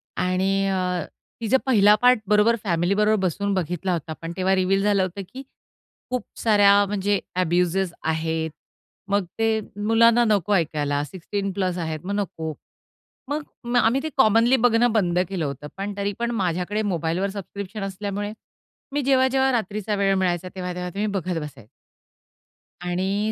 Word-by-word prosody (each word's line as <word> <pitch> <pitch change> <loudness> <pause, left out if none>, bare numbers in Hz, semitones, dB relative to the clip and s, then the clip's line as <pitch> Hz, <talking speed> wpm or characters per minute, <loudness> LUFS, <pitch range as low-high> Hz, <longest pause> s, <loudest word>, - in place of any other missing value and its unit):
आणि 190 +2 +1
अ, 180 -3 -1 0.4
तिचा 230 +3 +3
पहिला 210 -5 +5
पार्ट 250 -1 +5
बरोबर 210 +3 +4
फॅमिली 175 -1 +1
बरोबर 210 +1 +3
बसून 200 +4 -2
बघितला 180 0 -2
होता 160 -1 -4
पण 165 0 -5
तेव्हा 190 +1 +2
रिवील 190 +1 +1
झालं 200 -2 +3
होतं 185 +2 -4
की 265 +1 -7 0.7
खूप 250 -1 -2 0.2
साऱ्या 205 -2 +5
म्हणजे 200 0 0 0.2
एब्युजेस 180 +1 +1
आहेत. 160 0 -1 0.6
मग 200 -1 +1
ते 225 -1 +2 0.3
मुलांना 230 +1 +5
नको 205 -2 +2
ऐकायला 145 -5 0
सिक्स्टीन 195 +5 -4
प्लस 185 -2 -1
आहेत 160 -2 -3
मगं 200 +2 -3
नको, 165 -6 -3 0.8
मगं 280 -4 -2
आम्ही 240 +3 +3
ते 315 - -2
कॉमनली 235 0 +5
बघणं 240 -1 +3
बंद 180 -5 +1
केलं 185 -5 -2
होतं. 140 0 -5
पण 200 +1 -4
तरी 200 0 -1
पण 235 0 -1
माझ्याकडे 190 -1 -1
मोबाईल 170 -4 -1
वर 195 +1 0
सबस्क्रिप्शन 200 +1 -7
असल्यामुळे 200 +1 -4 0.6
मी 290 +1 0
जेव्हा, 260 -1 +3
जेव्हा 265 0 +2
रात्रीचा 215 -2 -2
वेळ 200 -1 +2
मिळायचा 185 -1 0
तेव्हा, 180 -1 -4
तेव्हा 180 0 -4
मी 215 - +1
बघत 185 -4 -2
बसायचे. 135 -8 -10 1.2
आणि 190 +4 -1
195 Hz, 155 wpm, -23 LUFS, 180-215 Hz, 1.2 s, पहिला